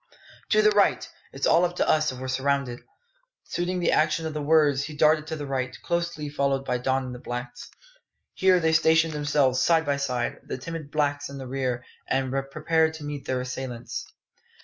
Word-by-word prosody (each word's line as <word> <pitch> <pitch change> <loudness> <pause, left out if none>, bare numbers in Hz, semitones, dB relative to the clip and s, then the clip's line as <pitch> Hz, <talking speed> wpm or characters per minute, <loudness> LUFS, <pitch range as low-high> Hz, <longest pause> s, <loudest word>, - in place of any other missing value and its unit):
"To 430 - +4
the 425 - +6
right! - - +2 0.2
It's - - -2
all 170 +2 +5
up 175 0 +1
with - - -1
us 155 -1 +3
if 130 - -8
we're 130 +1 -6
surrounded." 135 -1 -1 0.6
Suiting 180 +1 -2
the 175 - +2
action 155 +1 +2
to 160 - -2
the 150 0 -4
words, 145 -2 +3
he 155 - -8
darted 155 0 +3
to 160 - -3
the 145 -2 -5
right, 130 -2 -3
closely 170 -3 -2
followed 140 -2 0
by 125 -1 -1
Don 130 +1 0
and 125 - -6
the 125 - -8
blacks. 120 0 -6 0.6
Here 185 -1 +4
they 160 -1 +2
stationed 160 0 +4
themselves 145 -3 +2
side 165 +2 +3
by 140 -1 0
side, 125 -4 -2
the - - -5
timid 160 +2 -7
blacks 145 -2 -1
in 140 - -8
the 135 - -7
rear, 125 -2 -2 0.2
and 130 -1 0 0.2
prepared 160 +2 +1
to 155 - -9
meet 145 -1 -6
their 130 -1 -1
assailants. 125 -1 -6
145 Hz, 195 wpm, -26 LUFS, 130-160 Hz, 0.6 s, the